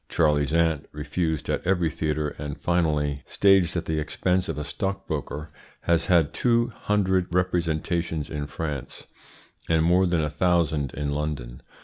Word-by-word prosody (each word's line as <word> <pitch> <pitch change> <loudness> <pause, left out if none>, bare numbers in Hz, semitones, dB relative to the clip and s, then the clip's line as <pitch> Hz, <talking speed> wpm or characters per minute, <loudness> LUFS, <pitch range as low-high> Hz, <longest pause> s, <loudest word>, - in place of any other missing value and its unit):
"Charley's 75 -3 +2
Aunt," 80 -3 +1
refused 75 +1 -2
at - - -1
every 90 -3 +1
theatre, 75 -1 -1
and 75 -1 -5
finally 75 -5 0
staged 95 -4 +3
at 85 - -3
the 80 -1 -1
expense 90 +4 0
of - - -3
a 75 - -3
stockbroker, 80 -5 -4 0.3
has 85 -1 +1
had 85 -5 +3
two 120 -1 +2
hundred 95 -5 0
representations 85 -3 -1
in 75 -2 -3
France, 75 -5 -5 0.6
and 80 -1 +3
more 90 +3 +4
than 85 -2 +1
a 75 - 0
thousand 80 -4 +1
in 75 0 -2
London. 70 -5 -4
80 Hz, 145 wpm, -25 LUFS, 75-90 Hz, 0.6 s, more